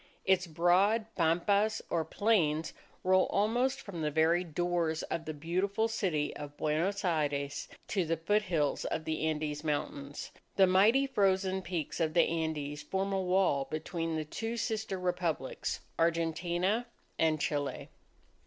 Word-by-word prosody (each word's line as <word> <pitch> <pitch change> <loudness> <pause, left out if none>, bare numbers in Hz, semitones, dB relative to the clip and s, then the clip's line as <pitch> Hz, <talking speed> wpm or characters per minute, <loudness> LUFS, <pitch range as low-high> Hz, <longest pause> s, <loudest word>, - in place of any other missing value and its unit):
Its 190 -1 +3
broad 180 +7 +3
pampas, 200 +6 +2
or 165 -2 +1
plains, 160 -4 +1 0.3
roll 185 0 +4
almost 245 +6 +1
from 175 -5 -7
the 150 - +1
very 160 +4 +3
doors 170 -1 -1
of 160 - -4
the 155 - -3
beautiful 185 +8 0
city 185 -10 -1
of 145 0 -8
Buenos 175 +7 0
Aires 145 -4 -1 0.2
to 195 -3 0
the 165 0 -1
foothills 170 -4 +1
of 160 - -2
the 160 0 -1
Andes 150 -1 -2
Mountains. 145 -2 -3 0.2
The 195 - +6
mighty 210 +9 +5
frozen 190 -6 +1
peaks 170 -4 -4
of 160 -1 0
the 170 - +6
Andes 155 -3 -2
form 195 +1 -2
a 190 - +1
wall 180 -7 +2
between 165 +1 -3
the 155 -1 -2
two 225 +9 -4
sister 215 -4 -2
Republics, 175 -6 -2 0.2
Argentina 170 +6 +1 0.3
and 160 -1 +3
Chile. 145 -1 -2
170 Hz, 140 wpm, -31 LUFS, 155-195 Hz, 0.3 s, The